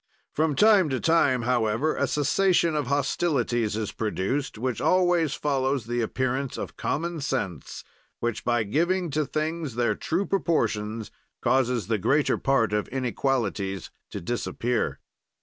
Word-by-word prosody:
"From 155 -1 +1
time 205 -1 +5
to 130 -2 -1
time, 145 -7 +3
however, 120 +4 +1
a - - 0
cessation 170 +2 +2
of 150 -4 -1
hostilities 130 -6 0
is 110 -2 -2
produced; 110 +6 -2
such 125 0 -2
always 175 -4 +3
follows 135 -3 0
the 120 +1 -1
appearance 130 +3 -2
of - - -6
common 170 +1 -2
sense 100 - -3 0.4
which, 120 -2 -2
by 120 -2 +1
giving 170 - 0
to 150 0 0
things 155 -4 -3
their 120 -1 +2
true 180 +5 -1
proportions, 115 - -1 0.3
causes 125 -5 +1
the 110 +1 0
greater 145 +9 +2
part 120 -6 +2
of 105 0 0
inequalities 120 -7 -2 0.2
to - - -5
disappear. 120 +4 -2
130 Hz, 135 wpm, -26 LUFS, 115-155 Hz, 0.4 s, time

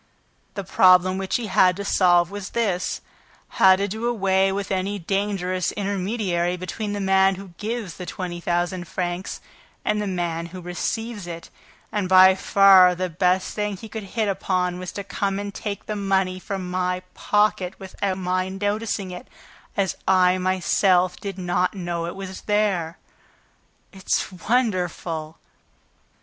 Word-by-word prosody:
The 200 - -3
problem 185 0 +4
which 190 -1 -2
he 240 - -1
had 185 -2 +4
to 200 +1 -5
solve 175 -2 +3
was 205 -1 -6
this: 195 -6 0 0.5
how 190 0 +6
to 200 +2 -1
do 220 +4 -3
away 195 -4 +2
with 195 0 -3
any 195 +2 -1
dangerous 190 -1 -1
intermediary 195 -3 -1
between 205 +4 -4
the 205 - -3
man 190 0 +3
who 195 0 -10
gives 215 -4 -4
the 180 - -7
twenty 175 -2 -5
thousand 175 +1 -1
francs 175 +1 -4 0.4
and 210 0 +1
the 205 - -2
man 170 -3 -2
who 185 +2 -9
receives 205 +4 -4
it. 170 -1 -8 0.4
And 200 -3 -1
by 185 0 +8
far 190 -1 +6
the 185 0 -3
best 180 +2 +1
thing 210 -2 -2
he 220 - -9
could 220 0 -6 0.2
hit 220 -2 +2
upon 180 -2 -1
was 185 0 -6
to 200 - -5
come 195 0 -2
and 200 0 -5
take 200 -1 -5
the 215 - -3
money 190 -2 0
from 185 -1 -5
my 180 0 -1
pocket 210 -3 +1
without 190 0 -3
my 185 0 -1
noticing 205 0 -2
it, 180 +8 -9 0.5
as 195 -2 +1
I 185 -1 +4
myself 185 0 +2
did 195 -2 -6
not 180 +1 0
know 175 -2 -3
that - - -3
it - - -8
was 190 -1 -7
there. 195 -6 +1 1.0
It's 190 0 -1
wonderful!" 180 -7 -1
190 Hz, 155 wpm, -23 LUFS, 180-200 Hz, 1.0 s, by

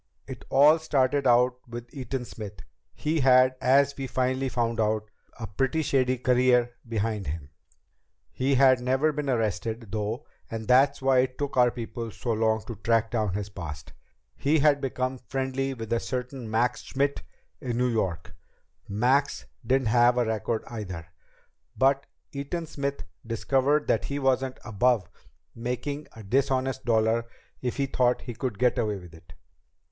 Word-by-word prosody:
"It - - -9
all 150 +4 +6
started 140 -3 +1
out 125 +1 +4
with 120 0 -8
Eaton 130 -1 -4
Smith. 105 -3 -9 0.3
He 155 +1 -1
had, 130 -1 +5
as 140 +2 +4
we 135 -1 -4
finally 130 +1 0
found 115 -2 -1
out, 110 -1 0 0.3
a 115 - -4
pretty 135 - 0
shady 130 -2 +1
career 125 -1 +3 0.2
behind 110 -2 -2
him. 70 -1 -5 0.8
He 135 +1 +1
had 130 -1 +5
never 130 +5 +2
been 150 -1 -3
arrested, 110 -2 -2
though, 110 +5 -3 0.2
and 110 -1 -5
that's 135 +2 +4
why 135 -1 +4
it 130 0 0
took 145 -1 -3
our 125 -1 +5
people 115 0 -6
so 120 +3 -4
long 110 -1 +1
to 115 - -7
track 115 +2 +1
down 110 -5 0
his 105 0 -3
past. 80 -6 -8 0.4
He 145 +3 +2
had 145 -1 +4
become 130 -1 -2
friendly 135 +1 -2
with 115 -1 -4
a 115 - +2
certain 125 -1 -5
Max 115 +3 +1
Schmidt 140 +1 -1 0.4
in 125 -5 -3
New 125 +1 +2
York. 90 -8 -2 0.5
Max 125 +7 +1 0.2
didn't 130 0 +1
have 120 +1 +4
a 120 - +2
record 110 0 -1
either, 90 -8 -7 0.7
but 135 +1 +2 0.2
Eaton 145 +5 -4
Smith 140 -2 -4 0.2
discovered 135 +6 +1
that - - +1
he 140 - -3
wasn't 130 -1 0
above 110 -2 +2 0.5
making 125 +5 -4
a 110 - -11
dishonest 130 +3 0
dollar 115 0 +2 0.3
if 125 -1 -3
he 140 - +1
thought 125 -2 +1
he 120 - -6
could 115 -2 -4
get 125 +2 +2
away 105 -3 0
with 90 -3 -12
it. 85 +1 -16
125 Hz, 160 wpm, -27 LUFS, 110-135 Hz, 0.8 s, all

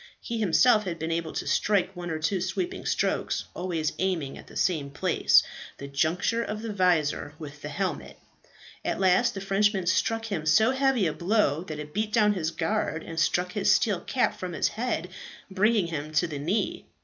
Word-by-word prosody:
He 230 -1 -4
himself 215 +3 +4
had 175 -3 -3
been 160 0 -3
enabled 165 -1 -2
to - - -3
strike 195 -2 +1
one 175 -1 -6
or 160 - -2
two 175 +4 -1
sweeping 355 - -3
strokes, - - 0
always 170 -4 -2
aiming 175 -8 -1
at - - -12
the - - -9
same 155 -6 0
place, 140 - +3 0.3
the 140 - -7
juncture 165 +11 0
of 215 -1 -4
the 225 -2 -4
visor 165 -6 +1
with 150 -2 -10
the 150 - -6
helmet. 185 +6 -3 0.7
At - - -2
last 195 +5 +3
the 195 - -4
Frenchman 195 0 +1
struck 225 +5 +1
him 185 -8 -3
so 220 +10 +5
heavy 265 -5 +2
a 155 - 0
blow 175 -5 +1
that 155 -3 -6
it 150 0 -8
beat 215 +1 -1
down 210 -2 +4
his 165 -5 -1
guard 160 -1 -2
and 165 0 -5
struck 180 +2 +1
his 200 +1 +2
steel 205 -6 +2
cap 250 - 0
from 180 -1 -5
his - - +1
head, 220 -6 -2 0.4
bringing 210 +1 +3
him 155 -2 -5
to 155 +3 +3
the 150 -4 -5
knee. 205 - -2
180 Hz, 195 wpm, -27 LUFS, 160-210 Hz, 0.7 s, so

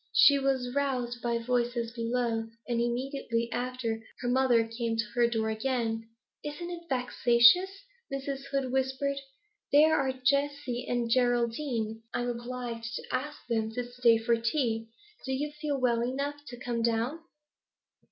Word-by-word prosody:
She 280 -1 +7
was 260 -2 0
roused 250 -4 -1
by 235 0 0
voices 240 0 0
below, 230 -1 -1 0.2
and, 235 -1 0
immediately 240 -1 -1
after, 245 -3 -2 0.2
her 245 - -2
mother 245 -2 +3
came 225 0 -2
to 225 - +1
her 240 -2 +4
door 220 -2 0
again. 225 -1 -1 0.3
'Isn't 345 +4 -5
it 340 -1 -8
vexatious?' 250 - +4 0.3
Mrs. 275 0 -4
Hood 275 -2 -1
whispered. 265 +1 0 0.5
'Here 305 +2 +6
are 270 -3 +2
Jessie 265 -1 0
and 240 -1 0
Geraldine. 235 -1 +1
I'm 245 0 0
obliged 240 -1 -5
to - - -4
ask 280 +4 -3
them 225 -2 0
to 245 - -2
stay 245 -2 +4
tea. 230 0 0 0.3
Do 265 - -2
you 290 +3 -2
feel 290 -3 -1
well 240 -2 +2
enough 280 +4 -3
to 245 - -8
come 240 -2 -2
down?' 235 +6 0
245 Hz, 140 wpm, -29 LUFS, 235-270 Hz, 0.5 s, She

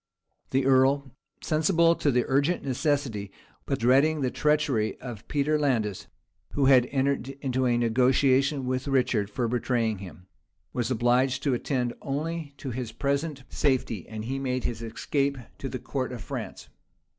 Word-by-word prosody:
The 130 0 +1
earl, 135 +1 +3 0.3
sensible 165 +1 +3
of 170 - -2
the 125 -5 +2
urgent 140 +6 +1
necessity, 130 -7 -1 0.4
but - - 0
dreading 140 +6 +3
the 130 -2 0
treachery 150 -8 +1
of 120 -5 -8
Peter 150 +1 +1
Landais, 115 -9 0 0.5
who 140 - +2
had 130 -2 +6
entered 135 -1 0
into 130 -2 0
a 120 -1 +2
negotiation 130 +4 +3
with 130 +2 -2
Richard 125 -6 +1
for 120 +3 -1
betraying 115 -3 0
him, 90 -2 -11 0.5
was 120 -1 -1
obliged 125 +2 +2
to 140 - +2
attend 125 -1 -1
only 150 +1 -4
to 135 - -5
his 120 -1 -4
present 140 +3 -2
safety; 125 - -1
and 110 0 -6
he 135 +3 -2
made 130 -2 -2
his 115 -2 -3
escape 140 +5 -1 0.2
to - - -4
the - - -4
court - - -3
of - - -7
France. - - -6
130 Hz, 155 wpm, -27 LUFS, 120-140 Hz, 0.5 s, had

